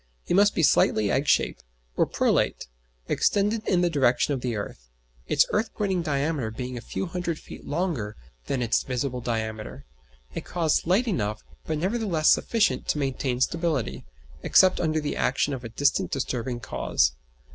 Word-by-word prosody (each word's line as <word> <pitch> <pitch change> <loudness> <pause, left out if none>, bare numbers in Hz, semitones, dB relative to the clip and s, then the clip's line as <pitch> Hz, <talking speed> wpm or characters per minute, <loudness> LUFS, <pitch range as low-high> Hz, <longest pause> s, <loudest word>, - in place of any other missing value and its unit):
It - - -1
must 200 +2 +4
be 165 - +1
slightly 105 -7 +3
egg 140 +2 0
shape, - - +2 0.4
or - - +2
prolate - - +1 0.4
extended 210 +2 +1
in 180 -2 +3
the 175 - +3
direction 135 -1 +2
of 130 - -3
the 120 -2 -2
earth; - - -7 0.4
its - - +4
earth 215 +2 0
pointing 190 -4 0
diameter 145 -5 -1
being 125 +3 -5
a 120 - -5
few 190 - -4
hundred 170 -2 -3
feet - - -12
longer 145 - -2 0.3
than 130 -3 -1
its 115 - +2
visible 125 0 -3
diameter; 110 - -4 0.5
a - - -2
cause 165 -3 0
slight 195 +9 +1
enough, 110 - -2 0.2
but 155 - -1
nevertheless 185 -3 +2
sufficient 205 - +2
to - - 0
maintain 135 -2 -1
stability, 165 -5 -1 0.4
except 185 -1 +5
under 155 -1 +1
the 150 -1 -3
action 140 +2 +1
of 130 -2 -5
a 115 - -6
distinct 140 +5 +1
disturbing 125 -2 -2
cause. 60 - +1
140 Hz, 165 wpm, -26 LUFS, 120-175 Hz, 0.5 s, except